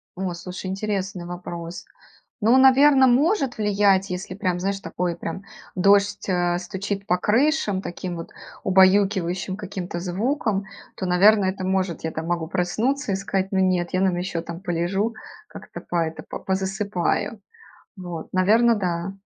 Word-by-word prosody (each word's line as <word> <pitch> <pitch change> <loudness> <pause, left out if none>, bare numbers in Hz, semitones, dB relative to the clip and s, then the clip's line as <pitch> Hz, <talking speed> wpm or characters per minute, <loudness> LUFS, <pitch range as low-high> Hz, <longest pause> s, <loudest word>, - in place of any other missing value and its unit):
О, 185 -1 -3
слушай, 180 +2 -7
интересный 195 -2 -3
вопрос. 175 -1 -7 0.6
Ну, 230 +5 +5
наверно, 265 0 +6
может 275 - +2
влиять, 200 -2 +2
если, 180 +1 -5
прям, 185 -3 -1
знаешь, 195 +1 -2
такой, 175 -1 -3
прям, 170 +3 -6 0.3
дождь, 200 +2 +3
э, 175 -2 +1
стучит 195 +2 -4
по 180 - +2
крышам 215 - +1
таким 175 0 -5
вот 165 - -8 0.3
убаюкивающим 190 -1 +3
каким-то 190 -3 -5
звуком, 200 - -1 0.3
то, 190 - -4
наверно, 195 +3 +5
это 190 0 -2
может. 185 -2 -1
Я, 160 - -2
там, 160 +1 -5
могу 170 -2 -1
проснуться 220 - -1
и - - +1
сказать: 190 0 -2
"Но 190 - +1
нет, 180 -2 +1
я, 185 - +2
наверно, 190 -2 +2
еще, 180 -2 -3
там, 170 +1 -7
полежу, 190 +4 -1 0.3
как - - -11
это - - -7
по 175 - -4
это, 160 0 -6
по - - -6
позасыпаю". 190 +2 -1 0.6
Вот, 175 -3 -7
наверно, 225 +6 +4
да. 180 -2 -2
190 Hz, 155 wpm, -23 LUFS, 175-205 Hz, 0.6 s, наверно